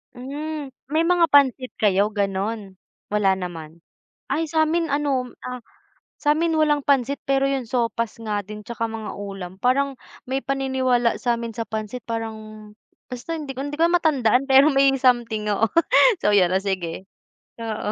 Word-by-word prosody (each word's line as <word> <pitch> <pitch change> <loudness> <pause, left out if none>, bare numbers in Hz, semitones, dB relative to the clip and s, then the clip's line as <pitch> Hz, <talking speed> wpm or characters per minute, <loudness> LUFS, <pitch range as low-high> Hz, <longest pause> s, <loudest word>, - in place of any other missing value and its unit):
Hmm, 285 +2 -6 0.2
may 315 +3 +1
mga 345 0 +4
pansit 265 -3 +3
kayo 205 -1 +2
gano'n, 200 0 -2 0.3
wala 205 -2 +3
naman. 165 -3 -8 0.5
Ay, 325 +1 0
sa'min 320 +1 +1
ano, 275 -4 0
ah, 250 0 -5 0.6
sa'min 320 +2 +1
walang 295 -2 +2
pansit 275 0 +1
pero 275 0 +2
'yung 270 -3 -1
sopas 230 -2 -1
nga 210 -2 -2
din 210 +2 -9
tsaka 230 -1 -3
mga 220 -1 -6
ulam, 195 -3 -7
parang 275 +2 +2 0.3
may 265 +1 -1
paniniwala 260 -3 +1
sa'min 235 -2 -1
sa 230 +1 -4
pansit 220 +2 -5
parang 225 -1 -3 0.7
basta 270 +6 -5
hindi 280 -3 -6
ko 265 - -4
hindi 290 +1 -5
ko 330 - +5
na 350 +1 +3
matandaan 270 -3 +2
pero 270 +2 +7
may 275 0 +5
something, 240 -4 +1
oo, 225 +3 +2 0.5
so 210 - +2
'yon 180 -3 +4
o 190 - +2
sige. 190 -2 -4 0.5
Oo, 215 -2 -3
250 Hz, 155 wpm, -23 LUFS, 210-280 Hz, 0.7 s, pero